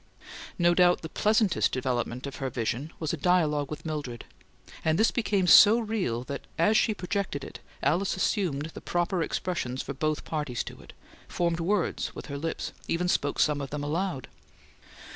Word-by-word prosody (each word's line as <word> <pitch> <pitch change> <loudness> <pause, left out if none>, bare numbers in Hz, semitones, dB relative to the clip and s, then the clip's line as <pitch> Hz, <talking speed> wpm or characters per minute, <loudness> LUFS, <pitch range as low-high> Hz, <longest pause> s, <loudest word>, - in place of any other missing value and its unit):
No 175 -1 +4
doubt 175 -1 +4
the 160 - -5
pleasantest 215 -1 +2
development 125 -1 -2
of 140 - -6
her 135 -2 -2
vision 125 +5 -3
was 160 -1 -2
a - - -1
dialogue 150 -3 +2
with 150 - -7
Mildred; 145 -7 -4 0.6
and 160 0 +2
this 220 +3 +4
became 205 -5 +1
so 210 +5 +8
real 210 - -1
that, 140 +2 -5 0.2
as 210 +7 +3
she 215 0 +3
projected 185 -6 -3
it, - - -9 0.2
Alice 170 +8 +1
assumed 165 -7 0
the - - -9
proper 175 +1 0
expressions 145 -8 -2
for 140 - -5
both 155 +2 -2
parties 145 -6 -2
to - - -10
it, - - -14 0.3
formed 170 -1 -1
words 185 +1 -1
with - - -7
her - - -3
lips, 165 +2 -3
and - - -22
even 175 +2 0
spoke 145 -5 0
some 145 -1 +2
of 135 - -5
them 145 +1 -4
aloud. 160 -1 -2
160 Hz, 180 wpm, -28 LUFS, 140-185 Hz, 0.6 s, so